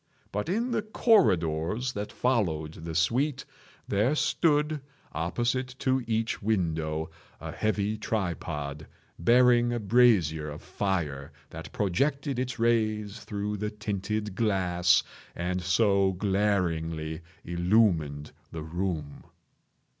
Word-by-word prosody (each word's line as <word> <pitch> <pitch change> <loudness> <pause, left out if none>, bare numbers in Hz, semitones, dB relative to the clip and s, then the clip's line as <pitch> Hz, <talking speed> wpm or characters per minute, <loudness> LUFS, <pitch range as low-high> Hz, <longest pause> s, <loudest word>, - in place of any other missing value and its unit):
But 105 +9 -3
in 230 +7 0
the 230 -2 +1
corridors 120 - +2
that 105 0 -4
followed 85 -12 0
the 80 0 -7
suite, 125 - +1 0.4
there 110 +9 +2
stood, 150 +1 +1 0.3
opposite 120 - -1
to 130 -1 +1
each 115 0 -1
window, 80 -7 -1 0.3
a - - -6
heavy 105 0 -1
tripod, 75 -8 -3 0.3
bearing 120 +4 +5
a 120 - -1
brazier 100 -9 +3
of 75 - -9
fire 80 -8 -2 0.2
that 80 0 -8
projected 135 - 0
its 130 -1 -3
rays 110 -2 0
through 105 0 -4
the 105 +1 -2
tinted 105 0 -3
glass 90 -5 +2 0.3
and 90 +1 -2
so 95 +1 +3
glaringly 90 -5 -1 0.2
illumined 85 -5 +1 0.2
the 80 -1 -6
room. 80 -3 -4
100 Hz, 110 wpm, -28 LUFS, 85-120 Hz, 0.4 s, bearing